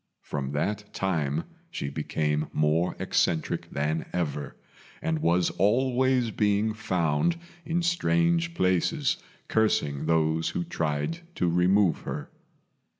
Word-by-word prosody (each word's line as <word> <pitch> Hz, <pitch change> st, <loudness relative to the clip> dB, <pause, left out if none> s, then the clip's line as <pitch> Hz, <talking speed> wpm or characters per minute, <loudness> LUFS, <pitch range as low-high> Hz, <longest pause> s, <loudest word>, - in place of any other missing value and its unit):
From 70 Hz, -1 st, -4 dB
that 105 Hz, +8 st, -2 dB
time 80 Hz, -5 st, 0 dB, 0.3 s
she -, -, -4 dB
became 75 Hz, +1 st, -1 dB
more 75 Hz, +3 st, +2 dB
eccentric 80 Hz, -2 st, 0 dB
than 75 Hz, +3 st, -1 dB
ever, 75 Hz, -5 st, -3 dB, 0.4 s
and 160 Hz, -1 st, -1 dB
was 85 Hz, -, +2 dB
always 125 Hz, +2 st, +2 dB
being 105 Hz, +1 st, +1 dB
found 90 Hz, -, 0 dB, 0.3 s
in 170 Hz, +2 st, 0 dB
strange 170 Hz, 0 st, +2 dB
places, 90 Hz, -, +1 dB, 0.3 s
cursing 75 Hz, -10 st, +1 dB
those 80 Hz, 0 st, +2 dB
who 180 Hz, -, -2 dB
tried 85 Hz, -, -2 dB, 0.2 s
to 90 Hz, -, +1 dB
remove 90 Hz, +2 st, +3 dB
her. -, -, -6 dB
90 Hz, 110 wpm, -27 LUFS, 75-125 Hz, 0.4 s, remove